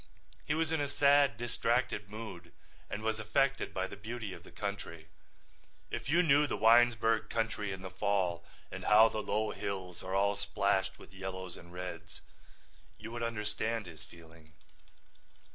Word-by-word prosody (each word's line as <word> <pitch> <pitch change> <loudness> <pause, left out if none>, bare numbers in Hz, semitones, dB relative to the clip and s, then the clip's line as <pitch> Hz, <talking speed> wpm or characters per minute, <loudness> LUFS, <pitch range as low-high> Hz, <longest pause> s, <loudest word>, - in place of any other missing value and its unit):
He 150 - +1
was 160 0 0
in 160 -2 +1
a 145 - 0
sad, 140 -4 +4
distracted 120 -2 0
mood 105 -6 -8 0.4
and 105 - -4
was 110 0 0
affected 135 +5 +1
by 95 0 -1
the - - -7
beauty 110 0 -5
of 85 - -10
the - - -14
country. 90 -6 -5 0.8
If - - -4
you 170 +4 +5
knew 150 -2 +5
the - - -2
Winesburg 115 -1 +4
country 110 -3 -1
in 95 0 -6
the 95 - -6
fall 95 -3 0 0.3
and - - -6
how 110 +2 +7
the 110 - -3
low 105 +1 0
hills 95 -3 -5
are 95 +1 -3
all 100 +1 +3
splashed 95 -1 0
with - - -15
yellows 95 -2 -6
and 85 0 -13
reds 90 -2 -7 0.8
you 110 +1 -8
would 120 0 -5
understand 110 -1 -2
his 80 -4 -11
feeling. 80 -1 -16
105 Hz, 160 wpm, -33 LUFS, 95-115 Hz, 0.8 s, how